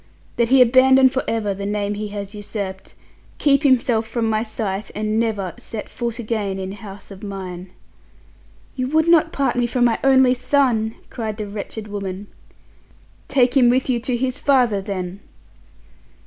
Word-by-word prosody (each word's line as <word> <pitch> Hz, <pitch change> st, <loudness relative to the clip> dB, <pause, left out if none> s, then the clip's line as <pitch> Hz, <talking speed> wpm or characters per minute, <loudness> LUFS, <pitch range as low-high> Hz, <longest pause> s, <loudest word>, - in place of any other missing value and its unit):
That 235 Hz, -1 st, +2 dB
he 260 Hz, -1 st, +7 dB
abandon 260 Hz, +2 st, +5 dB
for 265 Hz, +1 st, -2 dB
ever 215 Hz, -3 st, -1 dB
the 200 Hz, +1 st, -7 dB
name 205 Hz, 0 st, -1 dB
he 210 Hz, +1 st, -4 dB
has 200 Hz, 0 st, -6 dB
usurped, 200 Hz, -2 st, -6 dB, 0.4 s
keep 280 Hz, -1 st, +3 dB
himself 245 Hz, -5 st, +2 dB
from 225 Hz, 0 st, -1 dB
my 215 Hz, -1 st, +1 dB
sight, 215 Hz, -3 st, -4 dB
and 215 Hz, +1 st, -1 dB
never 210 Hz, -6 st, -1 dB
set 220 Hz, -2 st, -7 dB
foot 235 Hz, -1 st, -4 dB
again 215 Hz, -4 st, -2 dB
in 190 Hz, 0 st, -5 dB
house 200 Hz, -1 st, -10 dB
of 195 Hz, 0 st, -11 dB
mine." 190 Hz, -3 st, -7 dB, 1.1 s
"You 255 Hz, -1 st, -2 dB
would 315 Hz, +4 st, +2 dB
not 335 Hz, -2 st, +4 dB
part 275 Hz, -3 st, 0 dB
me 245 Hz, -1 st, +1 dB
from 245 Hz, +1 st, +1 dB
my 235 Hz, -2 st, +2 dB
only 260 Hz, -2 st, +5 dB
son!" 250 Hz, -4 st, +1 dB, 0.2 s
cried 220 Hz, -3 st, -4 dB
the 215 Hz, -, -4 dB
wretched 210 Hz, +1 st, -7 dB
woman. 200 Hz, -1 st, -5 dB, 1.0 s
"Take 255 Hz, -2 st, +2 dB
him 250 Hz, -3 st, +6 dB
with 255 Hz, +1 st, +2 dB
you 240 Hz, -, 0 dB
to 245 Hz, +1 st, -2 dB
his 255 Hz, +1 st, -2 dB
father 250 Hz, -8 st, +2 dB
then." 190 Hz, -2 st, -5 dB
225 Hz, 165 wpm, -21 LUFS, 200-255 Hz, 1.1 s, he